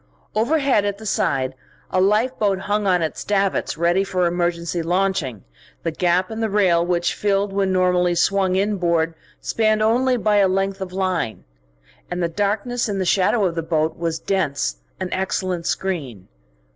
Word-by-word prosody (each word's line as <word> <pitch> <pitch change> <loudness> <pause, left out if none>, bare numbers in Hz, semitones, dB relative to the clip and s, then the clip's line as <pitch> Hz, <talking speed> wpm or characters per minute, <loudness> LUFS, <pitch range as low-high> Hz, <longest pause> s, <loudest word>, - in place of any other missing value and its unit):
Overhead, 265 0 +2
at 205 -1 -2
the 220 - -11
side, 135 -9 0 0.4
a 185 - +2
lifeboat 210 -1 +1
hung 205 +1 -1
on 180 -3 +3
its 160 - -3
davits, 195 -5 0
ready 175 +3 +2
for 185 -2 0
emergency 170 0 -1
launching, 170 - -1 0.4
the 165 - -1
gap 180 +3 +1
in 220 - -5
the 225 -1 0
rail 185 -5 +3
which 175 0 0
it - - -10
filled 200 -1 0
when 195 -1 +1
normally 180 -1 +2
swung 190 +1 +2
inboard 175 -5 +1 0.3
spanned 215 -1 +1
only 250 +3 +2
by 215 -2 +2
a 200 -1 +5
length 195 +1 -1
of 185 -1 -4
line. 185 - -2 0.7
And 180 0 -2
the - - +2
darkness 210 +6 -1
in 200 - -2
the 190 - -1
shadow 195 +4 +2
of 175 - 0
the 165 - -2
boat 160 -1 0
was 165 -1 -2
dense, 145 - -1 0.2
an 185 - -3
excellent 185 -2 -2
screen. 140 - -3
190 Hz, 170 wpm, -21 LUFS, 170-205 Hz, 0.7 s, a